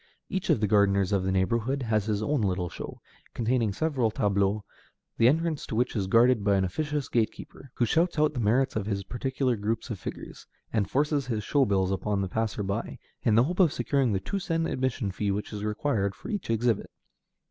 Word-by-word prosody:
Each 190 -1 -3
of - - +4
the 105 - +2
gardeners 100 -2 +3
of 100 -2 +2
the 95 - 0
neighborhood 115 +8 0
has 110 -3 +1
his 105 -1 -1
own 145 +1 +1
little 90 -3 0
show, - - -8 0.4
containing 115 -2 +1
several 130 0 0
tableaux, 100 0 +1 0.5
the 115 - +5
entrance 160 +2 +1
to - - -4
which 125 +2 0
is 100 -3 -1
guarded 115 +1 +4
by 100 -1 +3
an 95 - +2
officious 145 - -2
gate 115 -2 +1
keeper, 135 - -12
who 120 - +2
shouts 165 +8 +1
out 150 0 +3
the 125 - -3
merits 120 +5 +2
of 105 -2 -2
his 100 -2 -2
particular 130 +3 -1
groups 110 +3 -3
of 105 - -4
figures, - - -8 0.3
and 105 -4 +1
forces 145 -1 +1
his 110 -4 -2
show 140 +5 +2
bills 95 -3 +1
upon 100 +2 -1
the 95 - -1
passer 110 -1 -1
by, 100 0 -3 0.2
in 110 - +3
the 115 - +6
hope 175 +7 -3
of 175 -6 +5
securing 135 -4 +1
the 95 - +1
two 195 - -3
sen 165 -3 -1
admission 130 -8 -1
fee 100 +2 -2
which 105 +2 -3
is 105 -1 -5
required 105 -2 -1
for - - -10
each 205 - -3
exhibit. 115 -1 +1
115 Hz, 210 wpm, -27 LUFS, 100-135 Hz, 0.5 s, the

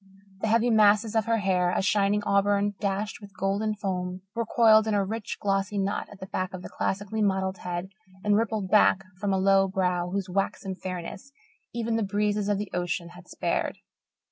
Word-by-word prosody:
The 220 - -1
heavy 230 +2 +3
masses 215 0 +4
of 220 -2 +2
her 230 0 +2
hair, 185 -3 +1
a 180 - 0
shining 205 +1 +2
auburn 200 0 +2
dashed 205 +1 -2
with 200 -2 -13
golden 200 +3 0
foam, 185 -2 -3
were 230 -1 -2
coiled 220 -2 +5
in 215 - +1
a 200 -1 +2
rich, 220 +1 -4
glossy 195 0 0
knot 200 +1 -1
at 205 - -13
the 190 - -6
back 185 0 -3
of 180 - -9
the - - -7
classically 205 +2 -2
modelled 190 -2 0
head 180 +1 -4 0.3
and 205 -1 +3
rippled 215 -3 -1
back 205 -2 +5 0.2
from 200 0 -1
a 190 - +2
low 195 0 +4
brow 180 -2 0
whose 195 +1 -2
waxen 195 0 -2
fairness 185 +7 -7 0.4
even 230 -1 -1
the - - 0
breezes 205 +1 0
of 205 - +2
the 205 0 -5
ocean 175 -1 -2
had 175 +1 -14
spared. - - -2
200 Hz, 195 wpm, -27 LUFS, 190-210 Hz, 0.4 s, coiled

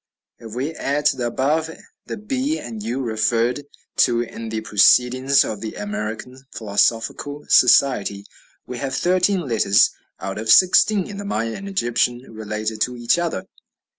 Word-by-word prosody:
If 115 -1 -10
we 140 +6 -3
add 145 -1 -2
to - - +3
the 120 -2 -1
above 150 +6 0 0.4
the - - -5
b 265 +8 -2
and 110 -3 -8
u, 120 +5 -3
referred 115 +3 0 0.3
to 120 -2 +3
in 115 -1 -7
the 110 0 -3
"Proceedings 125 +5 +4
of 105 -2 -5
the 110 - -6
American 105 +5 -6
Philosophical 115 +7 -1
Society," 105 -6 +3 0.4
we 125 -1 -7
have 135 -1 -3
thirteen 185 +3 +1
letters 115 - +3 0.3
out 95 +2 -5
of 110 0 -5
sixteen 190 - +5
in 205 - -8
the 205 - -6
Maya 115 - -2
and 200 0 -7
Egyptian 120 -8 0
related 110 0 -5
to 125 +1 -1
each 120 +8 +1
other. 170 - -3
120 Hz, 155 wpm, -21 LUFS, 110-145 Hz, 0.4 s, sixteen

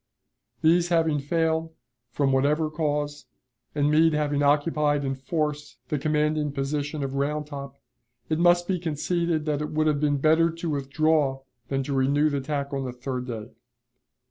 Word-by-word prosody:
These 170 +2 +4
having 160 -3 +2
failed, 160 +2 -1 0.3
from 135 +3 0
whatever 150 +4 +2
cause, 150 -2 -2 0.5
and 145 0 +2
Meade 160 +1 +4
having 145 -1 0
occupied 145 0 +2
in 135 - -1
force 150 -2 -3
the 150 - -1
commanding 150 0 0
position 145 +1 -2
of 135 -1 -3
Round 150 +2 -1
Top, 140 -2 -8 0.5
it 155 0 -1
must 175 0 +4
be 185 -2 0
conceded 165 0 -1
that 150 -1 -1
it 150 - -3
would 155 0 0
have 150 -2 +2
been 145 -1 +1
better 160 +3 +4
to 165 0 -5
withdraw 140 0 +1 0.3
than 135 0 -1
to 140 - -3
renew 140 +3 +2
the 140 - 0
attack 140 0 -3
on 135 -1 -1
the 125 - -3
third 125 0 -5
day. 115 -1 -6
150 Hz, 165 wpm, -25 LUFS, 140-155 Hz, 0.5 s, These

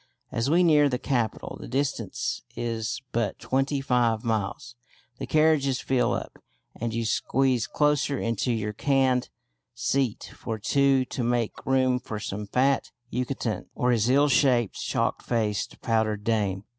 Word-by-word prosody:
As 115 +4 -1
we 175 +4 +4
near 150 -4 +5
the 125 - -1
capital 120 -5 -2
(the - - -8
distance 130 -6 -2
is 115 +1 -3
but 115 -2 -1
twenty 135 +1 0
five 120 -4 +1
miles) 110 +1 -2 0.5
the - - -4
carriages 155 -4 +3
fill 130 -2 +1
up, - - -5 0.4
and 115 0 -3
you 115 0 -2
squeeze 130 +2 +1
closer 150 -2 +1
into 115 +1 -1
your 105 -2 -2
caned 130 0 +1 0.5
seat 125 -1 -1
for 110 -1 -4
two 135 +4 +2
to 125 - -4
make 120 -1 -1
room 130 -1 +3
for 110 -3 -6
some 105 0 -5
fat 135 +6 +1 0.2
Yucatecan 125 -2 -2
or 125 0 +1
his 115 0 +2
ill 140 +3 +5
shaped, 125 -6 +3
chalk - - -1
faced 110 -4 -2
powdered 110 -2 0
dame. 100 -4 0
125 Hz, 145 wpm, -26 LUFS, 115-135 Hz, 0.5 s, near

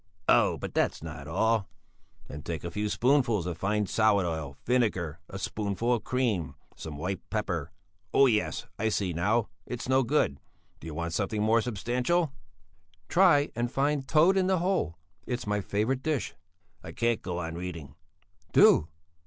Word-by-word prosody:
"Oh, - - +4
but - - -6
that's - - 0
not 70 +1 -7
all. 110 +5 +1 0.6
Then 75 - -8
take 80 +1 -5
a 85 - -4
few 105 +4 -2
spoonfuls 120 - +2
of 90 -2 -3
fine 105 +2 0
salad 100 -1 +3
oil, 80 -5 -4
vinegar, 95 -10 0
a 95 - -6
spoonful 105 +4 -1
of 115 -3 -1
cream, 115 - -1 0.2
some 75 -3 -7
white 90 +5 -3
pepper 90 -7 -2 0.4
oh, 140 - +6
yes, 110 -5 0
I 110 +1 +1
see 95 -4 -1
now, 105 +7 +1 0.2
it's 120 -1 -5
no 130 +1 +4
good. 120 - +1 0.4
Do - - -10
you 80 - -6
want 85 +1 -3
something 105 +2 -1
more 115 +1 +4
substantial?" 125 - 0 0.8
"Try 170 -6 +4
and 120 0 -1
find 140 0 0
toad 165 +6 +4
in 185 -1 +2
the 190 -1 +3
hole. 175 - 0 0.3
It's 125 -1 -3
my 105 0 0
favourite 110 +7 -1
dish." 145 -6 -1 0.5
"I 80 - -8
can't 115 -1 0
go 90 -1 -4
on 85 -2 -4
reading." 85 -5 -6 0.6
"Do!" 75 - +6
105 Hz, 165 wpm, -28 LUFS, 85-125 Hz, 0.8 s, oh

